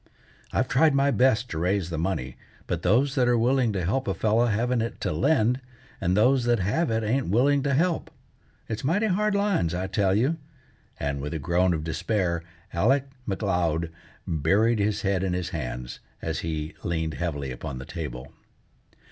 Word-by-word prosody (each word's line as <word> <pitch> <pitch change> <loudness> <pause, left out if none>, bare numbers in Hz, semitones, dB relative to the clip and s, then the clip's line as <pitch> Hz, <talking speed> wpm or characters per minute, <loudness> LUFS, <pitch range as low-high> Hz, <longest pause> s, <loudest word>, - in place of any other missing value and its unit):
I've 130 - +1
tried 140 +3 +4
my 140 +1 +3
best 125 -2 +3
to 80 - -2
raise 90 0 0
the 80 - -2
money, 80 -8 -2 0.3
but 85 -2 -2
those 125 +10 +3
that 130 -4 +2
are 120 -1 +4
willing 125 0 +2
to 95 -3 -1
help 130 +8 0
a - - 0
fellow 110 +2 +2
haven't 120 +2 +1
it 115 - -4
to - - -1
lend, 130 -3 +2 0.4
and 90 +1 +1
those 125 +3 +4
that 120 -1 +3
have 105 - 0
it 110 0 0
ain't 130 +5 0
willing 135 +8 +3
to 140 -1 +1
help. 170 +3 +1 0.6
It's 110 0 -4
mighty 180 +11 +2
hard 210 +1 +1
lines, 200 - +1
I 90 +1 -2
tell 95 0 +1
you," 135 +10 +2 0.6
and, 70 -1 -2
with 75 +3 -4
a - - 0
groan 90 +4 +2
of 75 - -4
despair, 85 +1 -1 0.3
Alec 135 +10 +2 0.2
M'Leod 90 -5 0 0.3
buried 100 +9 +2
his 105 0 0
head 100 -2 +1
in 95 -2 0
his 90 -1 -2
hands, 60 -5 -5 0.2
as - - -3
he 80 -1 -3
leaned 80 -2 -2
heavily 75 -6 -3
upon 65 +2 -6
the 65 - -7
table. 65 +1 -6
105 Hz, 180 wpm, -26 LUFS, 85-130 Hz, 0.6 s, tried